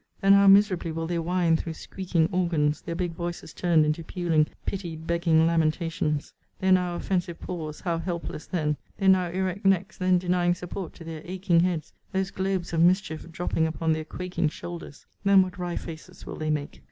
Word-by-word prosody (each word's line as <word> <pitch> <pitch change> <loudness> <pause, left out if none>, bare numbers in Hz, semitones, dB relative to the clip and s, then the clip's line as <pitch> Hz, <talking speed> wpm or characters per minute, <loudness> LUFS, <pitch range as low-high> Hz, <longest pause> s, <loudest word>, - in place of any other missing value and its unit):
Then 195 0 +5
how 200 0 +6
miserably 195 -4 +5
will 165 +1 -3
they 170 0 -1
whine 170 0 +2
through 160 0 -3
squeaking 175 -3 -1
organs; 165 -5 +1
their 170 - -5
big 175 0 -1
voices 170 +1 -6
turned 165 -3 +3
into 155 +2 -1
puling 165 -3 +1 0.2
pity 180 -4 -3
begging 160 0 +2
lamentations! 160 -2 0 0.3
their 190 0 +2
now 180 -1 +3
offensive 175 -2 -2
paws, 155 -4 -6
how 170 -2 -1
helpless 170 -3 -5
then! 150 -4 -1 0.2
their 195 -1 +3
now 185 -2 +4
erect 185 +2 -2
necks 195 +1 +1
then 185 -1 +3
denying 175 0 +1
support 180 +1 -6
to - - -11
their 160 -1 -7
aching 185 -1 +1
heads; 170 -3 0 0.2
those 190 0 0
globes 190 -2 -2
of 165 - +2
mischief 175 -2 +2
dropping 165 -1 0
upon 160 0 0
their 155 0 -2
quaking 175 0 -2
shoulders. 165 -2 -9 0.2
Then 200 -1 +6
what 185 -1 -7
wry 175 -1 -3
faces 160 -2 -8
will - - -6
they 155 0 -2
make! 150 -1 -2
175 Hz, 185 wpm, -26 LUFS, 160-185 Hz, 0.3 s, how